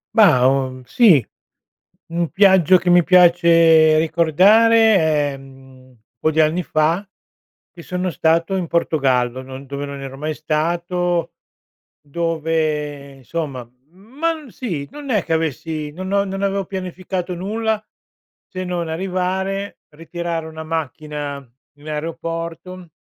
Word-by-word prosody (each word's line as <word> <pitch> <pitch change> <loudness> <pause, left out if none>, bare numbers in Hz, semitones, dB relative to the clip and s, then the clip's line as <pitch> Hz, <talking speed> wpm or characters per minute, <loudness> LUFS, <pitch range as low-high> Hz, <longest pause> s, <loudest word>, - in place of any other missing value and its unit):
Mah, 155 - +5
uhm, 130 -1 0
sì, 175 - +4 0.8
un 170 0 -2
viaggio 190 -3 +5
che 180 0 -2
mi 175 0 +6
piace 170 -3 +5
ricordare 200 +8 +4 0.4
è, - - -8
mhmm, 130 -2 -17 0.2
po' 155 - +1
di 160 - -1
anni 155 +3 +1
fa 160 +7 0 0.6
che 175 - -13
sono 180 +1 -3
stato 165 +3 +1
in 180 -3 -2
Portogallo, 130 -7 0
non 130 +1 -10
dove 140 +1 -5
non 140 -1 -7
ero 135 -1 -7
mai 155 +2 -3
stato, 170 +3 -1 0.7
dove, 155 -2 -2
insomma, 135 -1 -5 0.3
ma 255 - -3
m 310 -3 -12
sì, 180 - -5
non 290 -2 -7
è 210 -6 +1
che - - -8
avessi 155 -1 -3
no 180 +5 -8
no 200 +1 0
non 195 0 -5
avevo 195 0 -1
pianificato 185 -1 -5
nulla 215 +4 -2 0.7
se 185 0 -6
non 175 -2 -3
arrivare, 190 +3 -3 0.2
ritirare 165 0 -5
una 160 0 -8
macchina 150 -2 -4 0.4
in 150 +2 -11
aeroporto 165 +3 -6
165 Hz, 130 wpm, -19 LUFS, 150-185 Hz, 0.8 s, mi